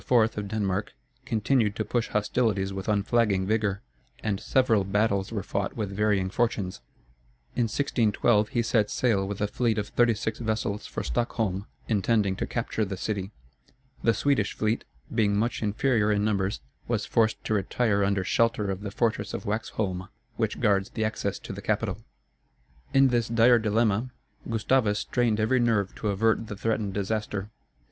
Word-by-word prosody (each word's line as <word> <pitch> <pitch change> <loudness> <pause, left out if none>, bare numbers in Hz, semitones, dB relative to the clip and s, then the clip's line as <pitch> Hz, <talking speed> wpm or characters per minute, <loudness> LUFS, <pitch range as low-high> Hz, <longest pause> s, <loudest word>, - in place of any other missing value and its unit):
of 110 -4 +3
Denmark, 105 -1 -2 0.3
continued 110 -1 +1
to 110 - -2
push 120 +2 0
hostilities 105 -2 0
with 95 0 -5
unflagging 105 -2 +2
vigor, 105 -1 0 0.4
and 100 -3 -1
several 115 -6 +2
battles 100 0 0
were 105 -4 -3
fought 100 +3 -3
with 100 -3 -3
varying 100 -2 +1
fortunes. 105 -6 -1 0.7
In 120 - +2
1612, 110 -3 +2
he 120 -1 0
set 110 -2 +2
sail 100 -6 +1
with 100 0 -5
a 105 - +2
fleet 115 +1 0
of 105 -1 -2
thirty 120 -2 +3
six 110 0 -3
vessels 110 -2 -2
for - - -4
Stockholm, 100 - -1 0.2
intending 105 -2 +2
to - - -2
capture 115 -2 -2
the 95 -2 -4
city. 100 -1 -3 0.7
The 115 -2 +3
Swedish 130 -4 +1
fleet, 110 +2 0 0.3
being 105 -3 +2
much 115 +3 0
inferior 110 0 +2
in 105 0 +1
numbers, 100 - 0 0.3
was - - 0
forced 110 -1 +1
to - - -1
retire 100 0 +1
under 100 -1 +1
shelter 110 0 +1
of 95 0 -4
the 100 - -4
fortress 115 +2 -1
of - - -6
Waxholm, 100 -3 -2 0.3
which - - -1
guards 100 -2 +2
the 110 - -2
access 110 - -2
to - - -8
the - - -7
capital. - - -1 0.9
In 135 0 +5
this 120 -2 +1
dire 115 +1 +5
dilemma, 110 +2 +1 0.4
Gustavus 110 -1 +2
strained 115 -1 0
every 110 +4 +2
nerve 110 -5 +1
to 110 - -3
avert 110 +3 +1
the 105 - -5
threatened 110 -2 -1
disaster. 105 0 -2
105 Hz, 160 wpm, -27 LUFS, 100-115 Hz, 0.9 s, In